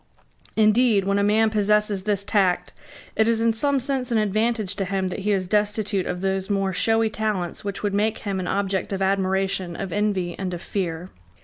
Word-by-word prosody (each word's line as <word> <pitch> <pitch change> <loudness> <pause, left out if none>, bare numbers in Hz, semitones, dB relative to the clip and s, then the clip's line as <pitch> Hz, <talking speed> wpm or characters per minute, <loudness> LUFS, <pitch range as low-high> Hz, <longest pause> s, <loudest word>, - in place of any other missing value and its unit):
Indeed, 220 -1 +4
when 200 +1 +1
a - - +2
man 215 +2 +3
possesses 210 -2 +1
this 205 -2 0
tact, 195 -4 +1 0.4
it 220 - +3
is 230 -1 +2
in 230 0 +2
some 280 +4 +1
sense 260 -1 -2
an 230 - +2
advantage 215 -1 0
to 195 - -1
him 190 0 -1
that 185 - -5
he 205 +2 -1
is 190 -2 +1
destitute 210 0 0
of 180 0 -3
those 190 0 -1
more 195 -2 0
showy 225 +3 +2
talents 210 -5 -2
which 200 0 -5
would 205 -1 0
make 215 +2 +1
him 195 -2 -3
an 180 - -3
object 195 -1 -1
of 195 0 -1
admiration, 190 -2 0
of 195 -1 -5
envy, 200 -4 -1
and 185 -2 -3
of 170 - -8
fear. 175 -2 -3
200 Hz, 200 wpm, -23 LUFS, 190-215 Hz, 0.4 s, Indeed